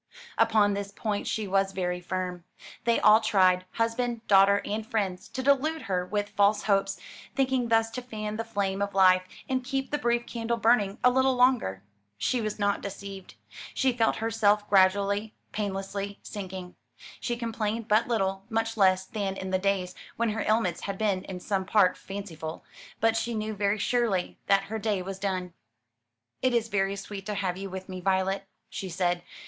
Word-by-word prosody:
Upon 205 -2 +4
this 200 0 -4
point 205 0 -3
she 215 -2 -2
was 195 0 +1
very 180 -1 -2
firm. 180 -1 -4 0.4
They 235 -1 +3
all 215 +1 +6
tried 185 -4 +3
husband, 230 0 -1
daughter, 200 0 +6
and 215 +2 -2
friends 200 -3 -2
to 260 - -5
delude 290 +4 +2
her 180 -2 -1
with 205 +1 -1
false 205 0 +3
hopes, 195 -1 +1 0.4
thinking 260 -2 +1
thus 225 0 +2
to 250 - -5
fan 215 -3 -5
the 225 - -2
flame 200 -3 -2
of 200 -1 -2
life 185 -1 +6 0.3
and 260 -1 -1
keep 270 +1 -3
the 295 - 0
brief 240 0 +1
candle 235 0 -2
burning 220 -3 +3
a 250 - +6
little 260 +1 +3
longer. 245 - +2 0.3
She 240 - 0
was 215 -1 -3
not 205 -1 +1
deceived. 200 -1 -8 0.4
She 265 -1 +2
felt 230 -2 +2
herself 215 -2 +2
gradually, 200 +2 +3 0.2
painlessly 200 0 -3
sinking. 185 -3 -7 0.5
She 240 -1 -2
complained 225 -1 -2
but 215 +1 +3
little; 195 -4 -1
much 225 0 -1
less 190 -2 +4
than 200 -4 -3
in 190 0 -5
the 185 - +2
days 190 -2 0 0.2
when 235 0 0
her 220 - -2
ailments 215 -6 +1
had 195 -1 -4
been 200 -3 0
in 185 -1 -6
some 195 +1 -1
part 190 0 +4
fanciful; 170 -5 -7 0.4
but 225 0 +3
she 235 +1 -1
knew 215 0 -2
very 200 +1 +1
surely 215 -4 0
that 195 0 +4
her 220 +3 -4
day 205 -3 -1
was 195 +1 -6
done. 185 -3 -2 0.9
"It 255 -1 +2
is 230 -1 +1
very 195 -1 0
sweet 195 0 -7
to 210 - -2
have 190 -3 -1
you 195 +1 -6
with 190 0 -7
me, 185 -1 -6
Violet," 190 +1 0 0.2
she 190 - -6
said. 175 0 0
205 Hz, 180 wpm, -28 LUFS, 190-225 Hz, 0.9 s, all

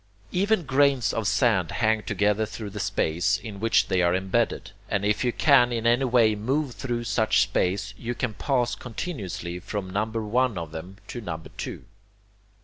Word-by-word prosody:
Even 195 +1 +2
grains 135 -6 +2
of 110 -2 -1
sand 100 -4 +2
hang 110 -1 +2
together 105 +1 +1
through 110 -1 -7
the 105 - -6
space 90 +1 +1
in 105 -4 -8
which 115 +2 +3
they 95 -1 +1
are 85 0 +3
embedded, 95 +5 -1 0.2
and 100 0 0
if 105 +4 +1
you 125 - +2
can 125 -3 +4
in 115 -1 -2
any 120 +3 +3
way 120 -3 +4
move 130 +6 -1
through 120 -3 -3
such 110 +1 +2
space, 100 +3 -1
you 120 +1 -3
can 115 -2 -2
pass 125 -1 0
continuously 105 - -5
from 100 +1 -5
number 110 +3 -1
one 120 0 +1
of 85 -2 -5
them 90 +5 -8
to 120 - -6
number 80 -6 -6
two. - - -6
110 Hz, 175 wpm, -26 LUFS, 100-120 Hz, 0.2 s, can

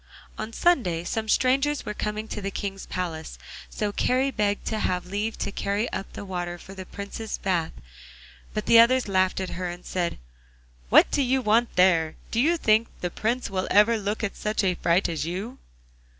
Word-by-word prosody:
On 215 +1 -5
Sunday 225 - +2
some 220 +4 -3
strangers 275 +5 +2
were 210 - -3
coming 210 +1 -3
to 210 - -4
the 195 - -2
King's 195 0 -5
palace, 165 -4 -4 0.3
so 210 -1 -2
Kari 260 +6 +1
begged 205 -4 -1
to 220 - -2
have 180 -3 -1
leave 205 +4 -3
to 200 - -3
carry 200 +4 -1
up 195 - -4
the - - -7
water 175 -2 -4
for 190 - -12
the 190 -1 -8
Prince's 200 +2 -6
bath, 175 -4 -1 0.8
but - - -3
the 230 - +7
others 250 +1 +5
laughed 185 -1 +2
at 190 -1 -3
her 180 0 -3
and 175 +1 -8
said, 175 -2 -2 0.7
'What - - +6
do 285 - +2
you 265 0 +2
want 235 0 +2
there? 170 -3 +4 0.2
Do 230 - 0
you 330 +7 +3
think 220 -5 +3
the 180 - -2
Prince 235 +3 -2
will 185 -1 -1
ever 210 +3 +5
look 210 +1 -2
at 210 - -2
such 215 0 -1
a 185 -2 +2
fright 175 +2 +2
as 160 -4 -2
you? 200 +9 -5
205 Hz, 195 wpm, -25 LUFS, 185-230 Hz, 0.8 s, the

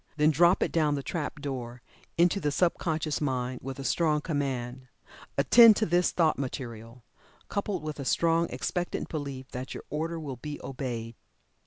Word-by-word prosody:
Then 150 +1 +4
drop 170 +4 +4
it - - -2
down 155 -3 +2
the 140 - -4
trap 150 -2 -4
door 125 -4 -5 0.3
into 175 +3 +4
the 150 -5 0
sub 170 +4 +1
conscious 160 -3 -1
mind, 130 -3 -1
with 135 0 -6
a 135 - -6
strong 155 +1 +2
command, 130 -5 -3 0.5
"Attend 230 -2 +8
to 220 - +1
this 175 0 +2
thought 160 -5 +2
material," 120 -3 -6 0.5
coupled 200 -4 -2
with 155 -1 -5
a - - -3
strong 165 +3 +2
expectant 175 -1 -3
belief 140 -4 -5
that 130 +1 -6
your - - -7
order 165 +3 -2
will 140 -5 -6
be 150 +4 -6
obeyed. 120 -4 -5
145 Hz, 170 wpm, -28 LUFS, 130-165 Hz, 0.5 s, Attend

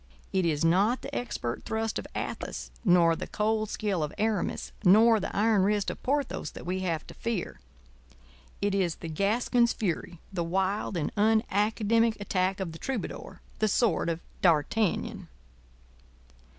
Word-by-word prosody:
It 190 -3 +2
is 155 -1 +1
not 200 +9 +3
the 275 - -7
expert 120 - -3
thrust 220 0 -2
of - - -7
Athos - - -4
nor 175 -5 +5
the - - -5
cold 215 0 0
skill 200 -6 -1
of 150 -1 -2
Aramis 215 -3 -1
nor 220 +4 +6
the - - -4
iron 215 -1 +3
wrist 205 +1 +1
of - - -10
Porthos 280 - -1
that - - -9
we 185 +1 -1
have 170 -4 -2
to - - -11
fear—it 60 - -6
is 185 -4 +1
the 165 - -8
Gascon's 230 +7 +2
fury—the 175 -1 -3
wild 190 +3 -1
and 155 - -2
unacademic 220 +1 +2
attack 190 -1 0
of 185 -4 -3
the 160 - -10
troubadour—the 225 -3 -4
sword 205 -5 +2
of 165 0 -2 0.2
D'Artagnan. 175 +4 +1
195 Hz, 140 wpm, -28 LUFS, 165-220 Hz, 0.2 s, nor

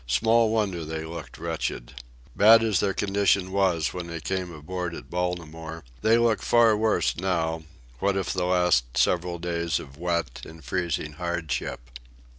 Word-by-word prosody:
Small 110 - +3
wonder 100 -6 0
they 80 +1 -5
look 85 +1 -8
wretched. - - -4 0.4
Bad 115 +2 +7
as 105 -5 +2
their 95 -2 0
condition 100 -2 +1
was 90 -7 +1
when 90 -1 -5
they 85 -1 -5
came 95 +1 -3
aboard 85 +2 -5
at - - -11
Baltimore, 80 -2 -4 0.2
they 110 +1 +4
look 115 -2 +2
far 115 -2 +4
worse 110 +1 +1
now, 80 -3 -1 0.4
what 100 +3 +1
of 95 - -1
the 90 -1 -1
last 90 -10 +2
several 90 0 +1
days 85 -1 -1
of 70 -1 -11
wet 85 -6 -2
and 80 0 -11
freezing 85 -4 -2
hardship. 70 -8 -4
90 Hz, 155 wpm, -26 LUFS, 80-95 Hz, 0.4 s, Bad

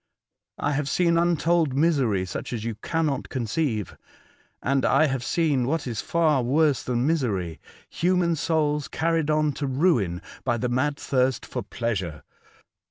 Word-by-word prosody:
I 145 - -1
have 145 -1 -1
seen 170 +2 +2
untold 170 -3 +2
misery 135 - +2
such 95 - -5
as 110 -3 -3
you 115 0 -2
cannot 150 +4 -2
conceive, 120 - -2 0.7
and 135 0 +1
I 150 +4 +4
have 135 -4 -1
seen 140 -4 +1
what 160 +2 -1
is 115 -5 -3
far 155 -5 +2
worse 145 +3 +2
than 125 0 -1
misery, 105 - -1 0.3
human 175 -1 +1
souls 150 -2 0
carried 165 -2 0
on 150 -1 +2
to 140 +1 -4
ruin 130 - +1 0.2
by 120 -2 0
the 125 +2 -1
mad 140 +4 0
thirst 130 -2 0
for - - -4
pleasure. 95 -10 -3
140 Hz, 150 wpm, -25 LUFS, 120-160 Hz, 0.7 s, I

